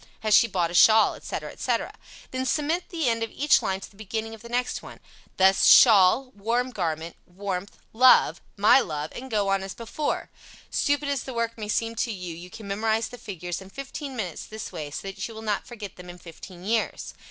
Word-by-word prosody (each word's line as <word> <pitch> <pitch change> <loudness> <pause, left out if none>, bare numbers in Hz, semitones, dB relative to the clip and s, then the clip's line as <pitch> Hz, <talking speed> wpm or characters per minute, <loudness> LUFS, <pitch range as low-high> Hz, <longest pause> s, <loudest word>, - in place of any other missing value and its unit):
"Has 215 -1 +1
she 230 - +7
bought 175 -5 -1
a - - -7
shawl?" 220 +5 +6
etc., - - -6
etc. - - -2 0.4
Then 260 0 -2
cement 305 +6 0
the 325 -6 -1
end 230 -1 +1
of 225 - -2
each 295 +6 +3
line 190 0 -2
to - - -10
the - - -23
beginning 220 +2 -5
of 220 - -11
the 235 - -11
next 245 +1 -1
one, - - -12 0.4
thus, 190 0 +5
"Shawl" 225 +3 +7
"warm 235 +5 -1
garment" 165 -5 -3
"warmth" 195 +1 -5 0.2
"love" 255 +3 +5 0.2
"my 215 +6 +6
love," 150 - -4
and 265 +2 -7
go 205 -4 0
on 195 0 +1
as 195 0 -6
before. 240 +6 -3 0.4
Stupid 285 0 +1
as 280 -3 -1
the 260 - -7
work 230 0 -1
may 215 -2 -6
seem 225 +1 0
to 230 - 0
you, 180 -4 -6
you 175 +2 -10
can 210 +2 -10
memorize 220 +3 0
the 245 - -11
figures 180 -4 -6
in 190 - -12
fifteen 275 +3 -7
minutes 185 -8 -4
this 220 0 -7
way 150 -2 -6
so 150 - -6
that 195 - -5
you 225 - -11
will 220 - -8
not 210 -2 -2
forget 215 -5 -9
them 180 0 -11
in 175 - -9
fifteen 175 +1 -12
years. 225 +1 -1
215 Hz, 215 wpm, -25 LUFS, 190-240 Hz, 0.4 s, she